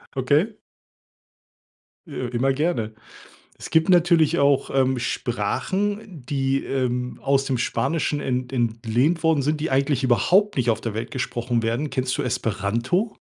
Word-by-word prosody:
Okay? 145 - +2 1.5
Äh, 130 -5 -4
g 120 - -8
immer 135 +2 +2
gerne. 135 -8 -1 0.6
Es - - -8
gibt 160 +3 +2
natürlich 170 -2 +4
auch 140 -1 +2
ähm 130 -1 +2
Sprachen, 185 - -2
die, 135 -1 0
ähm, 125 -2 -2
aus 135 0 +2
dem 130 -2 -1
Spanischen 150 +3 -1
ent 125 -1 -2
entlehnt 120 +6 0
worden 160 -3 +3
sind, 150 +1 0
die 160 - -1
eigentlich 135 0 +1
überhaupt 185 - +3
nicht 120 -2 +1
auf 110 - -3
der 115 -3 -4
Welt 115 +1 -4
gesprochen 120 -2 -2
werden. 120 +6 -1
Kennst 130 -1 -1
du - - -1
Esperanto? 120 - -1
135 Hz, 145 wpm, -23 LUFS, 120-160 Hz, 1.5 s, natürlich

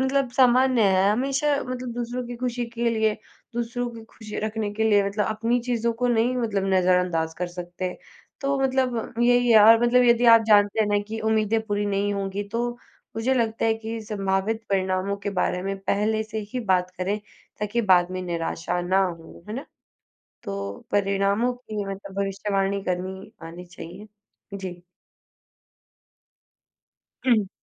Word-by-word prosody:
मतलब 265 -1 +1
सामान्य 255 -1 +4
है, 195 0 +4
हमेशा 275 +4 +1
मतलब 250 -1 -5
दूसरों 245 +1 -3
की 240 0 -6
खुशी 245 0 -2
के 235 0 +1
लिए, 220 -1 +1 0.4
दूसरों 240 +1 -2
की 225 -1 -11
खुशी 220 -1 -9
रखने 215 -1 -2
के 220 +1 0
लिए 205 -1 +4
मतलब 205 +1 -1
अपनी 225 +3 0
चीज़ों 235 -1 +1
को 245 - +3
नहीं 240 +2 +2
मतलब 215 -5 -1
नज़रअंदाज़ 180 -3 +2
कर 180 - -1
सकते। 180 +1 -5 0.5
तो 275 0 0
मतलब 255 -3 0
यही 245 0 +4
है, 220 - +8
और 225 +2 +7
मतलब 250 +1 +4
यदि 240 0 +4
आप 225 - +1
जानते 205 +1 +4
हैं 210 - +3
ना 205 0 +2
कि 225 0 -4
उम्मीदें 220 0 +1
पूरी 205 0 -1
नहीं 200 0 0
होंगी, 195 0 -3
तो 240 +2 -1 0.5
मुझे 255 +4 +1
लगता 225 -3 0
है 225 - +3
कि 225 +1 -5
संभावित 205 +1 -1
परिणामों 190 +1 0
के 200 0 -4
बारे 180 -1 -1
में 195 0 -3
पहले 215 +3 0
से 220 0 -5
ही 250 - -2
बात 180 0 +2
करें, 200 +3 -1 0.4
ताकि 210 +3 0
बाद 175 0 +4
में 185 0 -4
निराशा 175 0 -2
ना 185 +2 +2
हो। 170 -1 -8
है 215 - -4
ना? 270 - -5 0.8
तो 200 +3 -6
परिणामों 200 +3 +1
की 215 -5 -6
मतलब 195 0 -7
भविष्यवाणी 195 0 -1
करनी 185 +1 -4 0.2
आनी 175 +2 -10
चाहिए। 175 +4 -10 0.5
जी। 180 -2 -7 2.5
हुँ। 215 -6 +3
215 Hz, 160 wpm, -24 LUFS, 195-235 Hz, 2.5 s, है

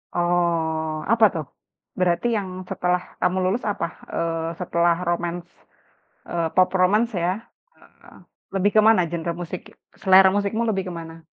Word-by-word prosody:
Oh, 165 -3 0
apa 230 -1 +6
tuh? 160 -3 -4 0.5
Berarti 180 +5 +1
yang 195 - -3 0.2
setelah 180 0 0 0.2
kamu 185 +1 +1
lulus 200 +7 0
apa, 170 - -2 0.3
eee, 165 0 -1
setelah 170 -1 +2
romance, 175 0 -2 0.8
eee, 170 -1 -1
pop 185 0 +5
romance 210 +6 +3
ya? 180 - +2 0.5
Heeh, - - -20 0.4
lebih 195 +2 +2
kemana 215 -2 +6
genre 170 0 -2
musik 175 +1 -5 0.4
selera 190 -1 +7
musikmu 205 +3 0
lebih 195 -3 0
ke 180 - -5
mana? 165 0 -11
175 Hz, 135 wpm, -23 LUFS, 170-190 Hz, 0.8 s, selera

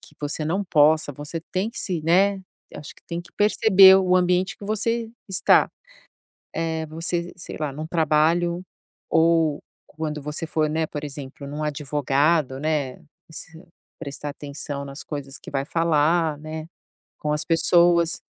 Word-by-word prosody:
que 180 -4 -17
você 150 +1 -2
não 175 +6 0
possa 155 -3 +3
você 145 +4 -6
tem 190 +4 0
que 235 - -7
se 180 -4 -1
né, 190 +5 +3 0.3
acho 145 - -9
que - - -22
tem 170 0 -4
que 175 - -16
perceber 195 -2 +7
o 185 -1 +2
ambiente 180 +2 +2
que - - -11
você 225 +2 -1 0.2
está. 190 - +4 0.9
É, 160 -1 -2
você, 170 +2 -2
sei 180 - -7
lá, 150 -3 -2
num 155 +3 -6
trabalho 165 +2 +1 0.5
ou 160 -2 +3 0.3
quando 150 -1 -5
você 150 +3 -3
for, 155 -1 0
né, 160 +1 -1
por 150 0 -6
exemplo, 140 -1 -7
num 145 +2 -6
advogado, 145 -1 0
né, 150 -4 -1 0.4
e - - -15
se 165 +1 -9 0.4
prestar 145 -1 -6
atenção 140 0 -6
nas 140 +1 -8
coisas 140 -2 -6
que - - -12
vai 135 -1 -1
falar, 165 0 +1
né, 155 +1 -7 0.5
com 150 - -2
as 150 0 0
pessoas. 170 0 +3
160 Hz, 155 wpm, -23 LUFS, 150-175 Hz, 0.9 s, perceber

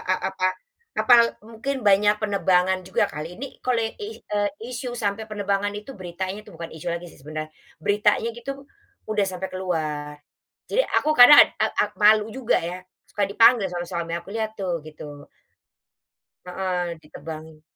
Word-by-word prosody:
a 185 - +3 0.2
apa 185 -1 +1 0.5
apa 250 - +3 0.3
mungkin 230 +3 -4
banyak 205 +1 +5
penebangan 190 -3 +2
juga 190 - +2
kali 160 +4 -6
ini 275 +2 -8
kalau 255 -1 +2
i 410 - -5 0.2
e 210 - -4 0.4
isu 245 0 -5
sampai 215 0 -2
penebangan 205 -1 -1
itu 210 +6 -8
beritanya 185 0 -5
tuh 175 - -15
bukan 165 0 -7
isu 160 +1 -6
lagi 170 +1 -3
sih - - -18
sebenarnya, 155 +2 -6 0.3
beritanya 210 +2 +2
gitu 275 +4 -7 0.4
udah 215 -2 0
sampai 190 +1 -5
keluar, 155 -5 -3 0.6
jadi - - +3
aku 305 - +2
kadang 250 +4 +11 0.2
ak - - +2
ak - - -2
malu 210 0 +6
juga 250 -2 +1
ya, 175 +2 -4 0.3
suka 205 - -3
dipanggil 230 +1 +5
soalnya 175 -1 -4
sama 170 -1 -3
suami 165 - -6
aku, - - -18
"Lihat 220 -1 -1
tuh," 185 -2 -1
gitu. 145 -2 -10 1.2
Heeh, 180 -2 -2
ditebangin. 155 0 -10
190 Hz, 160 wpm, -24 LUFS, 170-220 Hz, 1.2 s, kadang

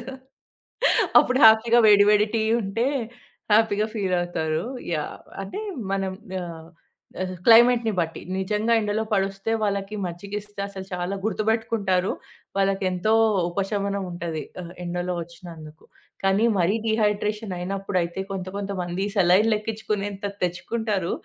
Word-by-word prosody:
బావుంటాదా? 260 +2 -8 1.1
అప్పుడు 255 +1 +2
హ్యాపీగా 225 +2 +6
వేడి 205 -1 +7
వేడి 210 0 +4
టీ 220 - +1 0.2
ఉంటే 200 +5 -1 0.7
హ్యాపీ‌గా 215 -1 +3
ఫీలవుతారు. 175 -5 -1 0.3
యాహ్! 150 -1 -4 0.2
అంటే 195 - -6 0.3
మనం 195 -1 -1 0.3
యాహ్! 165 -2 -7 0.6
ఆహ్, 185 0 -4
క్లైమేట్‌ని 235 0 +6
బట్టి, 165 -1 -2 0.2
నిజంగా 210 +4 0
ఎండలో 210 +1 -1
పడొస్తే 195 +1 -1
వాళ్ళకి 200 0 -2
మజ్జిగిస్తే 200 +3 -6
అసలు 190 -1 -8
చాలా 180 +2 -2
గుర్తుపెట్టుకుంటారు. 215 -3 0 0.5
వాళ్ళకి 195 0 +1
ఎంతో 185 +4 0 0.4
ఉపశమనం 200 +1 -2
ఉంటది. 170 -2 -4 0.2
ఆహ్, 175 +1 -10
ఎండలో 175 +1 -2
వచ్చినందుకు. 165 -3 -12 0.4
కానీ 195 +3 +3
మరి 180 +4 +2
డీహైడ్రేషన్ 210 -1 0
అయినప్పుడైతే 185 -1 -2
కొంత 190 -1 -4
కొంతమంది 190 -2 -3
సెలైనులెక్కించుకునేంత 205 +1 +1 0.2
తెచ్చుకుంటారు. 190 +1 -1
195 Hz, 110 wpm, -24 LUFS, 180-215 Hz, 1.1 s, వేడి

